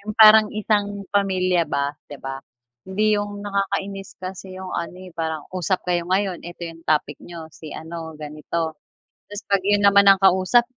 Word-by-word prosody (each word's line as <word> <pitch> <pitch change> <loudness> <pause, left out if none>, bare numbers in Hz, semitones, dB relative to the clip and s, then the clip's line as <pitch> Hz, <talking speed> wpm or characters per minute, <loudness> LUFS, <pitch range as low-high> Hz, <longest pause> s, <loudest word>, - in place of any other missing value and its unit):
'Yung 215 - -5
parang 215 -1 +8
isang 205 -2 -1
pamilya 185 -3 +2
ba, 140 +1 -1 0.2
'di 145 - -8
ba? 135 0 -6 0.4
Hindi 210 +3 +1
'yung 205 0 -3
nakakainis 195 -1 -3
kasi 185 0 -8
'yung 190 -1 -6
ano, 170 +1 -4
eh, 185 -2 -12
parang 160 -2 -3
usap 185 +1 -1
kayo 175 -1 +1
ngayon, 190 -2 0
ito 175 0 -7
'yung 165 0 -10
topic 155 -2 +1
niyo, 170 -2 -9
si 155 -2 -10
ano 160 0 -7
ganito, 155 +2 -4 0.6
tas 205 +1 -6
pag 200 -2 +2
'yun 205 0 +3
naman 200 0 +6
ang 195 - +6
kausap, 190 +6 +4
185 Hz, 170 wpm, -22 LUFS, 165-200 Hz, 0.6 s, parang